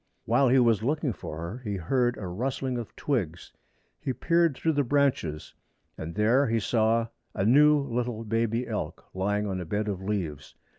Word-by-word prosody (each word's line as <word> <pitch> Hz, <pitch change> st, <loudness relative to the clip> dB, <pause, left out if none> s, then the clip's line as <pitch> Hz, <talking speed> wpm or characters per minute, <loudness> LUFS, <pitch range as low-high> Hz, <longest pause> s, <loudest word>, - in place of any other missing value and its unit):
While 125 Hz, +3 st, +3 dB
he 130 Hz, -, +5 dB
was 115 Hz, -5 st, +4 dB
looking 145 Hz, +1 st, 0 dB
for 75 Hz, -, -7 dB
her 85 Hz, +8 st, -5 dB
he 105 Hz, -5 st, -4 dB
heard 120 Hz, +7 st, +1 dB
a 100 Hz, -, -6 dB
rustling 125 Hz, +6 st, -2 dB
of 115 Hz, -, -8 dB
twigs. 95 Hz, -, -2 dB, 0.5 s
He 130 Hz, -, -2 dB
peered 170 Hz, 0 st, +2 dB
through 165 Hz, -, +1 dB
the 145 Hz, -1 st, +2 dB
branches, 130 Hz, -, 0 dB, 0.4 s
and 80 Hz, +1 st, -7 dB
there 115 Hz, +7 st, +3 dB
he 115 Hz, 0 st, +1 dB
saw 115 Hz, +1 st, +1 dB, 0.3 s
a 95 Hz, -, 0 dB
new 150 Hz, +5 st, +6 dB
little 120 Hz, -4 st, -2 dB
baby 115 Hz, +2 st, 0 dB
elk -, -, -4 dB
lying 105 Hz, +2 st, 0 dB
on 95 Hz, -2 st, -2 dB
a -, -, -5 dB
bed 105 Hz, +5 st, -2 dB
of 95 Hz, -3 st, -3 dB
leaves. 90 Hz, -8 st, -4 dB
115 Hz, 180 wpm, -27 LUFS, 100-130 Hz, 0.5 s, new